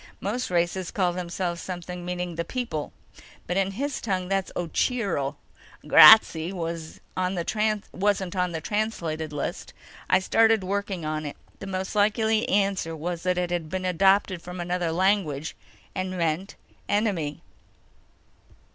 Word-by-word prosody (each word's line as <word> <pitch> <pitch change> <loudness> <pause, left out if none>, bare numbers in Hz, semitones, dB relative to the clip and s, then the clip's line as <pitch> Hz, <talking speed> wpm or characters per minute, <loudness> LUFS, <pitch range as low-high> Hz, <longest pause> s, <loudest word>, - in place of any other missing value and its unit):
Most 235 +6 -2
races 175 +1 0
call 180 -3 0
themselves 175 -1 -3
something 180 -1 -6
meaning 180 0 -3
The 170 +1 -2
People. 165 - -4 0.5
But 180 - -2
in 195 0 +1
his 280 +6 -3
tongue 185 -4 -2
that's 195 -1 0
Ocheero. 175 - -1 0.5
Grazzi 170 -6 +8
wasn't 165 -3 -5 1.3
on 180 -1 0
the 160 -1 -4
translated 170 -7 -2
list. 145 -1 -4 0.4
I - - +6
started 225 +2 +3
working 195 -3 -2
on 155 0 -2
it. 145 - -7 0.2
The 195 - -7
most 190 0 -3
likely 220 +1 +2
answer 195 -4 +1
was 170 +2 -4
that 180 0 0
it 180 -1 -1
had 170 -3 -2
been 185 +2 -3
adopted 190 0 +3
from 180 +1 -8
another 175 -1 -1
language, 165 -5 0 0.4
and 185 0 -2
meant 175 +1 -2 0.3
enemy." 195 -9 0
180 Hz, 130 wpm, -26 LUFS, 170-195 Hz, 1.3 s, Grazzi